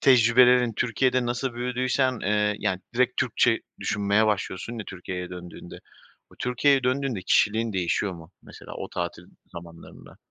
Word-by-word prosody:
tecrübelerin 125 0 +5
Türkiye'de 125 +2 +1
nasıl 120 +1 -2
büyüdüysen, 125 +1 0
eee, 105 +1 +1
yani, 95 0 -1
direkt 125 0 +1
Türkçe - - +2 0.2
düşünmeye 100 +1 +1
başlıyorsun 105 +2 -2
ya 105 - -6
Türkiye'ye 90 -1 -6
döndüğünde. 90 -1 -10 0.5
O - - -17
Türkiye'ye 130 +2 +2
döndüğünde 130 -4 -1
kişiliğin 110 +3 +2
değişiyor 95 +2 -1
mu 85 0 -13
mesela - - -11
o - - -6
tatil 85 -1 -5 0.3
zamanlarında? 85 -1 -12
110 Hz, 135 wpm, -25 LUFS, 95-125 Hz, 0.5 s, tecrübelerin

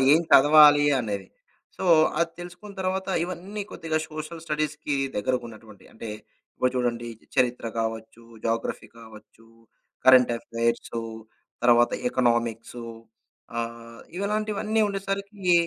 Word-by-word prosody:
ఏం 160 - +6
చదవాలి 145 +1 +8 0.2
అనేది? 100 -4 -4 0.5
సో, - - -5 0.3
అది 170 0 +1
తెలుసుకున్న 180 +4 -10
తర్వాత 190 +1 -2 0.2
ఇవన్నీ 190 +4 -6
కొద్దిగా 160 -1 -2
సోషల్ 155 +1 -7
స్టడీస్‌కి 150 -1 -2 0.2
దగ్గరకున్నటువంటివి. 110 -3 -4
అంటే 110 0 -8 0.5
ఇప్పుడు 125 - +1
చూడండి 120 -1 -1 0.3
చరిత్ర 125 -2 +1
కావచ్చు, 110 +1 -4 0.2
జాగ్రఫీ 115 0 -2
కావచ్చు, 110 0 -15 0.6
కరెంట్ 125 -2 +7
ఎఫైర్సు 115 0 -2 0.6
తర్వాత 120 0 +5 0.2
ఎకనామిక్సు 120 -1 0 0.7
ఆహ్, 115 0 -6 0.2
ఇవలాంటివన్నీ 215 +2 -1
ఉండేసరికి 195 -1 -2
130 Hz, 100 wpm, -25 LUFS, 115-175 Hz, 0.7 s, చదవాలి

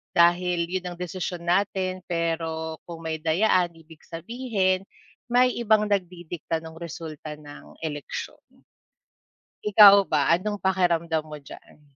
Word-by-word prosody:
dahil 175 0 +3
'yun 180 -1 -3
ang 175 - -16
desisyon 180 -1 -5
natin 185 0 0
pero 165 -1 -2
kung 170 -1 -9
may 160 0 -3
dayaan 175 +2 +2
ibig 160 -1 -17
sabihin 195 0 -1 0.4
may 250 +1 +4
ibang 215 -2 +2
nagdidikta 175 -4 -3
nung 160 0 -11
resulta 160 -2 -7
ng 145 -1 -13
eleksyon. 150 -3 -5 1.3
Ikaw 200 -1 +8
ba 150 0 +2
anong 205 +5 0
pakiramdam 170 -4 +1
mo 150 - -7
diyaan? 150 - -14
175 Hz, 120 wpm, -25 LUFS, 160-190 Hz, 1.3 s, Ikaw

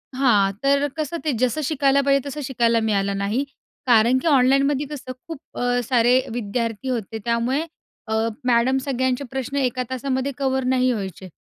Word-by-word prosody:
हां, 210 -7 +3
तर 280 +1 +3
कसं 310 +2 -2
ते 300 - +2
जसं 255 +4 +1
शिकायला 280 -2 +2
पाहिजे 275 0 +4
तसं 295 +2 -5
शिकायला 235 -3 +2
मिळालं 200 -1 0
नाही. 210 +7 0 0.4
कारण 235 +2 +5
की - - -2
ऑनलाईनमध्ये 275 0 +3
कसं 275 -3 -7 0.2
खूप 325 -4 -7 0.2
अ, 245 0 +1
सारे 240 0 +3 0.2
विद्यार्थी 230 +1 -3
होते, 225 -3 -3
त्यामुळे 235 +4 +1 0.5
अ, 220 - -2 0.3
मॅडम 250 +2 +3
सगळ्यांचे 260 0 0
प्रश्न 265 +1 -4
एका 255 -2 0
तासामध्ये 260 +1 -2
कव्हर 265 -1 0
नाही 255 0 +2
व्हायचे. 190 -4 -5
255 Hz, 160 wpm, -22 LUFS, 235-275 Hz, 0.5 s, कारण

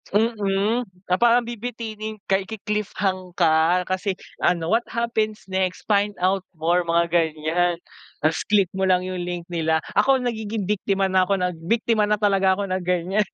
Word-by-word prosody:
mm, 215 +1 +1 0.2
na - - +6
parang 240 +1 +5
bibitinin 220 -2 -6
kay 195 0 0
iki-cliffhang 200 -4 -3
ka 170 +1 +3
kasi 185 +2 -2 0.2
ano, 170 0 +1
what 230 +2 +3
happens 220 -2 -2
next, 185 -1 -1
find 205 0 +2
out 190 0 +1
more, 170 +2 +1
mga 170 0 +2
ganyan, 165 +1 +1 0.5
tas 155 +1 +2
click 200 -4 +3
mo 190 0 -1
lang 180 -1 +3
yung 185 0 -4
link 175 0 -4
nila, 160 -2 0
ako 260 +5 +3
nagiging 220 -3 -3
biktima 195 -1 0
na 185 -1 +3
ako 200 - +2
ng 180 -1 -1
biktima 225 -1 +2
na 210 - +3
talaga 195 -2 +2
ako 200 - 0
ng 185 0 -1
ganyan. 180 +3 +1
195 Hz, 160 wpm, -23 LUFS, 180-215 Hz, 0.5 s, na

